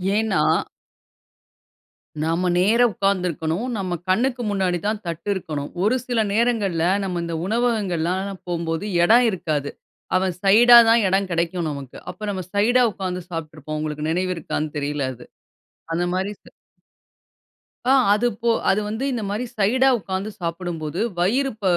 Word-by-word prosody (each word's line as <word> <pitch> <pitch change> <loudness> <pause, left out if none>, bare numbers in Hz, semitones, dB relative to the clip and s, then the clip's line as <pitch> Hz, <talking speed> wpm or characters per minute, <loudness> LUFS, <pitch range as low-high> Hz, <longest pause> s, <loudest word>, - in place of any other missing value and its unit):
ஏன்னா 210 -8 +1 1.8
நம்ப 165 +3 0
நேரா 220 +7 +4
உட்கார்ந்து 195 -1 0
இருக்கணும். 165 - -2
நம்ம 185 -2 -3 0.2
கண்ணுக்கு 245 +5 +1
முன்னாடி 190 -3 0
தான் 215 0 -1
தட்டு 170 +4 -5
இருக்கணும். 150 -6 -5
ஒரு 225 +5 +3
சில 235 -3 +1
நேரங்கள்ல 210 -8 +1 0.2
நம்ப 185 -2 -3
இந்த 170 -1 -4
உணவகங்கள்லாம் 195 -6 0
நான் 195 -2 -8
போகும்போது 170 +1 -2 0.2
இடம் 235 +6 +6
இருக்காது. 155 -7 -2 0.5
அவன் 185 -1 0
சைடா 235 +5 +8
தான் 230 -1 +5
இடம் 195 0 +1
கிடைக்கும் 170 0 -1
நமக்கு. 140 -3 -8
அப்போ 185 +4 -13
நம்ம 185 -2 -4
சைடா 240 +5 +3
உட்கார்ந்து 180 -2 -4
சாப்பிட்ருப்போம். 155 -2 -6
உங்களுக்கு 150 0 -3
நினைவு 185 +2 0
இருக்கான்னு 155 -1 -3
தெரில 145 -1 -2
அது. 120 0 -13 0.7
அந்த 175 +1 0
மாதிரி 190 +2 -1
ச... - - -71 1.5
ஆ - - +6 0.2
அது 215 +4 +3
போ 235 - +1 0.2
அது 205 +2 +2
வந்து 220 +5 -3
இந்த 230 -4 -3
மாரி 215 +5 -2
சைடா 245 +6 +3
உட்கார்ந்து 195 0 -4
சாப்பிடும்போது, 170 -2 -4 0.2
வயிறு 250 +10 +1
ப - - -16
185 Hz, 145 wpm, -22 LUFS, 165-215 Hz, 1.8 s, சைடா